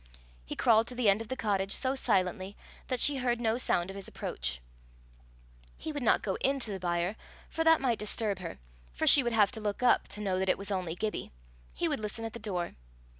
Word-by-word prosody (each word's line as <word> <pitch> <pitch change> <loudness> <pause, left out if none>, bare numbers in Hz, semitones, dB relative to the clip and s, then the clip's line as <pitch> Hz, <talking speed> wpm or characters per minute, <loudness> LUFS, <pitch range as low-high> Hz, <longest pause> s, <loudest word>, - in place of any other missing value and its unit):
He - - -5
crawled 225 -1 +4
to 250 - -6
the 240 -4 +3
end 200 +3 +3
of 225 - -7
the 260 - -3
cottage 200 -5 0
so 260 0 +1
silently 195 -5 0 0.3
that 255 -2 -1
she 285 +2 +5
heard 245 -2 0
no 230 0 0
sound 180 -6 0
of - - -10
his 195 -1 -6
approach. - - -3 1.2
He 315 - -5
would 290 -2 -4
not 240 - +3
go 195 - -2
into 270 -5 0
the 195 - -4
byre, 175 +2 -1 0.4
for 325 - 0
that 325 0 +6
might 245 -4 +1
disturb 210 -1 -2
her, 175 -2 -6 0.4
for - - 0
she 285 - +8
would 240 -2 -1
have 210 -3 +4
to 225 -3 -6
look 210 +3 -3
up 245 - +4
to 210 - -7
know 190 -3 0
that 190 0 0
it - - +3
was 200 +1 -6
only 180 -4 -2
Gibbie; 210 +3 -3 0.4
he - - 0
would - - -1
listen 215 +2 -4
at 225 - -5
the 235 - -7
door. 185 -6 -3
210 Hz, 225 wpm, -30 LUFS, 190-240 Hz, 1.2 s, she